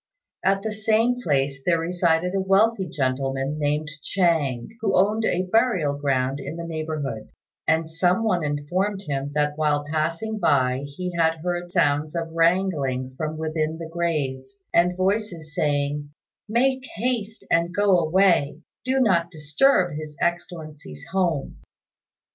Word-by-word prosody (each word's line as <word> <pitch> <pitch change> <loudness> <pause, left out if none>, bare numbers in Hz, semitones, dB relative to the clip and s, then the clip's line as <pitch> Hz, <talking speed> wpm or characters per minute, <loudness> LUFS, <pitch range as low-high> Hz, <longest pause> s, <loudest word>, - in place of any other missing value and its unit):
At 195 +1 +2
the 220 - -2
same 225 +3 +1
place 135 - 0
there 170 +1 +3
resided 170 +1 +1
a 195 - +1
wealthy 195 0 +2
gentleman, 135 +1 -1
named 150 +1 0
Chang, 155 -11 0
who 225 - +1
owned 210 +4 +2
a 180 -3 +1
burial 215 - +2
ground 135 -1 0
in 150 - -6
the 170 0 -5
neighbourhood; 155 -8 -4 0.4
and 160 +1 +2
some 175 +6 +1
one 180 -7 +1
informed 180 +8 -1
him 140 -3 -3
that 150 0 0
while 145 -1 +1
passing 165 +8 -1
by 130 -4 +2
he 180 0 -3
had 165 -1 +2
heard 175 0 -2
sounds 150 -2 +1
of 165 -1 -3
wrangling 165 -7 +1
from 155 +2 -3
within 155 0 -2
the 165 0 -6
grave, 155 -6 -1 0.3
and 180 +1 +3
voices 185 -5 -1
saying, 145 -1 -1 0.4
"Make 260 +3 +2
haste 225 -2 -2
and 170 +1 +2
go 195 -1 +3
away; 165 -3 +2 0.2
do 260 +1 +1
not 175 -8 +3
disturb 170 - +2
His 155 -1 -8
Excellency's 155 - -4
home." 175 -7 -1
165 Hz, 140 wpm, -24 LUFS, 145-190 Hz, 0.4 s, there